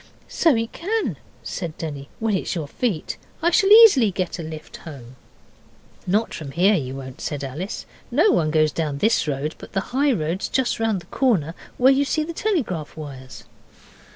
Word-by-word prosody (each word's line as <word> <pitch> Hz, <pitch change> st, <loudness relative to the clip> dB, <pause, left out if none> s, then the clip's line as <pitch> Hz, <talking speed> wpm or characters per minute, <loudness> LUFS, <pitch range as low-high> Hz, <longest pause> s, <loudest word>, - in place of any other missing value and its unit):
'So 325 Hz, -6 st, +3 dB
it 230 Hz, 0 st, -2 dB
can,' 430 Hz, +6 st, -2 dB, 0.3 s
said 165 Hz, -4 st, -5 dB
Denny, 145 Hz, -3 st, -6 dB
'when 220 Hz, -1 st, -1 dB
it's 190 Hz, -, -2 dB
your 160 Hz, -4 st, -3 dB
feet. 195 Hz, -, -2 dB, 0.3 s
I 345 Hz, -, +4 dB
shall 390 Hz, +2 st, +4 dB
easily 420 Hz, -, +8 dB
get 180 Hz, -2 st, -3 dB
a -, -, -2 dB
lift 155 Hz, -1 st, -8 dB
home.' 130 Hz, -6 st, -11 dB, 0.9 s
'Not 210 Hz, +5 st, +1 dB
here 170 Hz, +7 st, +1 dB
you 135 Hz, -8 st, -2 dB
won't,' 135 Hz, +2 st, -9 dB
said 145 Hz, -2 st, -4 dB
Alice. 150 Hz, +9 st, -5 dB, 0.2 s
'No 425 Hz, -, +4 dB
one 155 Hz, -2 st, +2 dB
goes 155 Hz, -1 st, +3 dB
down 150 Hz, -3 st, -2 dB
this 220 Hz, +2 st, +2 dB
road; 145 Hz, +2 st, -2 dB
but -, -, -12 dB
the -, -, +1 dB
high 280 Hz, +2 st, +3 dB
road's 170 Hz, -3 st, -1 dB
just 260 Hz, -3 st, 0 dB
round 220 Hz, -5 st, 0 dB
the -, -, -16 dB
corner, 190 Hz, -, +1 dB, 0.2 s
where 260 Hz, +2 st, +6 dB
you 275 Hz, +1 st, +2 dB
see 310 Hz, +2 st, 0 dB
the 335 Hz, +2 st, -6 dB
telegraph 255 Hz, -, -2 dB
wires. 135 Hz, -4 st, -9 dB
180 Hz, 180 wpm, -22 LUFS, 150-250 Hz, 0.9 s, easily